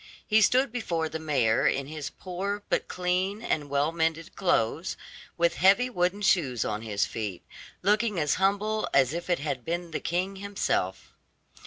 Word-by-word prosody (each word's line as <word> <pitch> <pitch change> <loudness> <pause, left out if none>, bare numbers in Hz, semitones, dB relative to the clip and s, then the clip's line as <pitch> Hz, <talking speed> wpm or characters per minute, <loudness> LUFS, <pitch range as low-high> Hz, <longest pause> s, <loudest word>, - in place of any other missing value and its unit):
He 220 0 +4
stood 255 +4 +4
before 170 -9 -2
the 160 - -5
mayor 130 -8 +2
in 140 - +1
his 150 0 -5
poor 195 +3 -4
but - - 0
clean 185 +4 -1
and 150 -8 -1
well 145 +3 +1
mended 165 0 -1
clothes, 165 - 0 0.4
with 170 -4 +2
heavy 200 - +4
wooden 180 0 0
shoes 135 - +2
on 105 0 -2
his 105 -3 0
feet, 105 -5 -5 0.4
looking 210 0 +2
as 150 -2 +2
humble 210 +3 +1
as 135 0 +4
if 170 +2 -5
it 175 - +3
had 140 -4 -3
been 170 +2 -3
the 155 - -2
king 185 +3 -2
himself. 190 - -2
170 Hz, 165 wpm, -27 LUFS, 145-195 Hz, 0.4 s, He